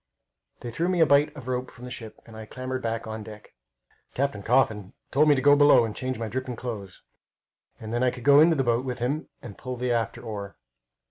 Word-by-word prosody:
They 120 - -6
threw 170 +9 -1
me 185 -1 0
a 160 - +7
bight 145 +1 +4
of 130 -4 -10
rope 125 0 -2
from 125 - -12
the 125 - -8
ship, 115 -4 -8
and 115 - -13
I 110 0 -9
clambered 130 +1 -5
back 115 -1 -3
on 110 0 -6
deck. 105 0 -12 0.6
Captain 135 -6 -1
Coffin 110 -4 +1 0.2
told 150 +3 +4
me 145 - +6
to 130 - -2
go 145 0 +7
below 145 -4 +6
and 110 - -6
change 130 -1 -3
my 115 0 -4
dripping 130 +1 -4
clothes, 110 -6 -7 0.8
and 110 0 -7
then 120 - 0
I 130 - +3
could 125 -1 -8
go 140 +1 +7
in 160 +3 +7
the 150 -5 +2
boat 120 0 +1
with 125 -2 -4
him 140 +6 -2
and 110 -5 -10
pull 130 -1 -5
the 125 0 -2
after 115 -2 -2
oar. 100 -3 -7
125 Hz, 230 wpm, -26 LUFS, 110-135 Hz, 0.8 s, a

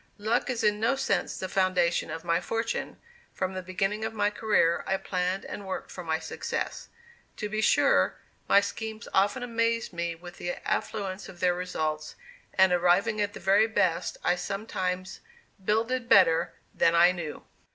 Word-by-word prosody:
Luck 225 +5 0
is 245 -2 -1
in 210 -1 +2
no 230 +5 +2
sense 270 0 -1
the 185 - -3
foundation 185 -3 +1
of 165 - -5
my 170 0 +1
fortune; 225 +5 -3 0.4
from 185 0 -2
the 185 - -4
beginning 195 +4 -2
of 225 0 -3
my 205 -1 +1
career 205 -6 +2
I 190 - +1
planned 185 0 -2
and 200 - -7
worked 190 - -5
for 180 - -7
my 160 -1 0
success. 160 - -4 0.5
To 210 - -3
be 215 +1 -2
sure, - - +3 0.3
my 200 - +7
schemes 220 +2 -5
often 205 +6 +2
amazed 230 -2 0
me 170 0 -2
with 175 +2 -12
the 175 - -3
affluence 195 -3 -2
of 180 -2 -12
their 180 -1 +3
results, 155 -4 -3 0.4
and, 190 -1 +5
arriving 180 +4 +3
at 205 0 -1
the - - -8
very 200 +4 +4
best, 185 -6 0
I 180 - +2
sometimes 185 -1 -3 0.4
"builded 230 +4 0
better" 170 -3 +5 0.2
than 165 - +3
"I 175 +1 +7
knew." 170 -4 -6
190 Hz, 170 wpm, -28 LUFS, 175-215 Hz, 0.5 s, my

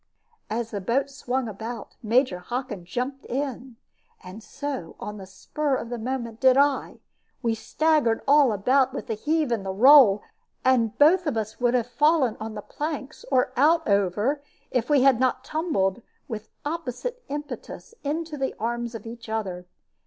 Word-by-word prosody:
As 230 +1 -3
the 205 -3 -3
boat 265 +8 0
swung 260 -2 -2
about, 220 +2 -7
Major 230 -4 +2
Hockin 225 -2 -5
jumped 250 +8 -4
in, 260 -2 -4 0.5
and 185 +4 -10
so, 275 - -6
on 210 0 -6
the 190 -2 -9
spur 280 +9 -2
of 235 - -4
the 240 - -3
moment, 235 -1 -4
did 260 0 +5
I. 280 -1 +1 0.4
We 230 -1 +2
staggered 295 0 +1
all 285 -3 +6
about 255 +6 +2
with - - -4
the - - -2
heave 300 +5 0
and 225 -4 0 0.2
roll, 255 -6 +8 0.4
and 240 -4 +3
both 340 +4 +5 0.3
would 245 0 +3
have 240 -2 +2
fallen 295 -1 +2
on 220 0 -6
the 210 - -6
planks, 295 -2 -5
or 255 -1 +2
out 320 +5 +4
over, 205 +8 +1 0.3
if 245 0 0
we 285 -3 +4
had 265 -3 +5
not 255 0 +1
tumbled, 255 - -1 0.3
with 220 -4 -6 0.2
opposite 335 - -4
impetus, 295 +9 -7
into 310 +1 -3
the 270 - -2
arms 235 +1 -2
of 225 - -8
each 230 0 -9
other. 190 -5 -3
250 Hz, 160 wpm, -25 LUFS, 220-285 Hz, 0.5 s, roll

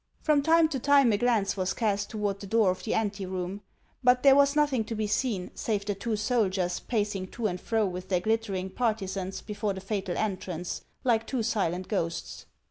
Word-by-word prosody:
From 300 -2 +4
time 325 +2 +5
to 275 -4 -2
time 275 -3 +5
a - - +2
glance 225 -5 +2
was 190 -1 -1
cast 205 -3 0
toward 205 -2 -2
the 200 - -8
door 215 -2 +3
of 185 - -6
the 220 - -1
anteroom; 195 -2 -2 0.4
but 250 0 +4
there 275 -1 +8
was 280 0 +4
nothing 290 -6 +2
to 225 - -4
be 215 0 -1
seen, 210 -3 -1
save 205 -3 -2
the 205 - 0
two 215 +3 -2
soldiers 195 -5 0
pacing 205 -5 -2
to 235 +4 -5
and 180 -3 -1
fro 225 -2 +1
with 185 -1 -5
their 180 -2 +1
glittering 200 -3 -1
partisans 195 -4 -2
before 205 -1 -3
the 190 - -6
fatal 195 -2 -3
entrance, 185 -4 -3 0.2
like 230 -3 +2
two 255 -4 -1
silent 185 -4 -1
ghosts. 170 -5 -3
210 Hz, 195 wpm, -28 LUFS, 190-235 Hz, 0.4 s, there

